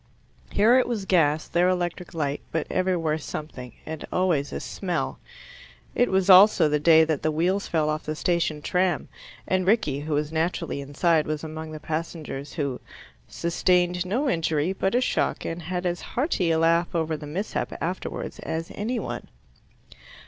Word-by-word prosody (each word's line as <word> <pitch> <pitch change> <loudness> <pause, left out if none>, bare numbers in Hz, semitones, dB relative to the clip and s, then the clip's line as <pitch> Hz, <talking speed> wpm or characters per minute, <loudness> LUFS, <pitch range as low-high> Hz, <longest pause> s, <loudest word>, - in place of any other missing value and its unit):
Here 230 +5 +5
it - - +1
was 225 -5 -2
gas, 155 -5 +2
there 175 +1 +2
electric 175 -1 -2
light, 145 -2 -1
but 160 -2 -1
everywhere 170 -4 0
something, 135 -5 -7
and 160 -1 -6
always 170 -6 +1
a - - -4
smell. 180 -3 -3 0.7
It 245 - +2
was 190 0 +2
also 190 -2 +8
the 150 0 +1
day 160 +1 +6
that 160 -3 -1
the 155 - +1
wheels 180 +6 0
fell 155 -2 +1
off 155 0 -1
the 155 - -3
station 160 -3 0
tram, 180 -3 0 0.4
and 185 -1 +1
Rickie, 190 - +2
who 150 +1 -2
was 150 +1 -1
naturally 160 -2 -1
inside, 155 +3 +1
was 155 0 -3
among 160 0 -6
the 155 - -7
passengers 155 -3 -5
who 140 -5 -3 0.5
"sustained 180 +1 +1
no 235 +11 -1
injury 165 - 0
but 190 +3 -1
a 250 - +3
shock, - - 0
and 165 +1 -4
had 180 +2 -4
as 175 -1 -1
hearty 245 - -1
a 165 - +3
laugh 165 +1 +2
over 160 -1 0
the 150 -1 -8
mishap 190 +8 -3
afterwards 180 +3 -4
as 165 +1 -4
any 230 +5 -2
one." - - -5
165 Hz, 170 wpm, -25 LUFS, 155-185 Hz, 0.7 s, also